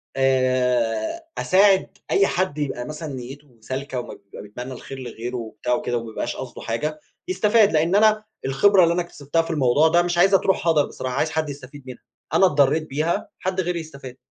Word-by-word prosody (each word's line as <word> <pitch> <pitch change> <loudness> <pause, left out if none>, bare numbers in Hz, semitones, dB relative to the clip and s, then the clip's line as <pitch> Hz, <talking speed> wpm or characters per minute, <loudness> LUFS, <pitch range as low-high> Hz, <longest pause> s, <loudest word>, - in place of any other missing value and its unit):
آآ 130 - +1
أساعد 195 0 +3
أي 195 - +4
حد 180 -5 -1
يبقى 135 -4 -3
مثلًا 150 -1 -6
نيُّته 130 0 -10
سالكة 130 +2 -4
وما - - -7
بيبقى 100 0 -12
بيتمنى 125 +6 -8
الخير 135 +2 -9
لغيره 120 0 -6
وبتاع 115 +2 -3
وكده 120 0 -1
وما 115 -1 -6
يبقاش 120 - -3
قصده 130 -2 -8
حاجة، 150 +7 -3 0.3
يستفاد. 220 - +3
لإن 165 +5 +2
أنا 215 0 +4 0.2
الخبرة 185 +8 +4
اللي 170 0 +3
أنا 175 - 0
اكتسبتها 165 -2 -2
في 165 - -6
الموضوع 150 +1 +3
ده 170 +2 +4
مش 175 0 -1
عايزها 195 +2 +5
تروح 190 -3 0
هَدَر 155 -3 +4
بصراحة 130 -1 -5
عايز 155 - +1
حد 155 -2 -1
يستفيد 140 0 -10
منها. 125 - -10 0.3
أنا 190 - +5
اتضرِّيت 150 0 +2
بيها، 155 +5 -1
حد 185 0 -1
غيري 175 -1 -2
يستفاد. 140 -5 -10
145 Hz, 185 wpm, -22 LUFS, 125-175 Hz, 0.3 s, عايزها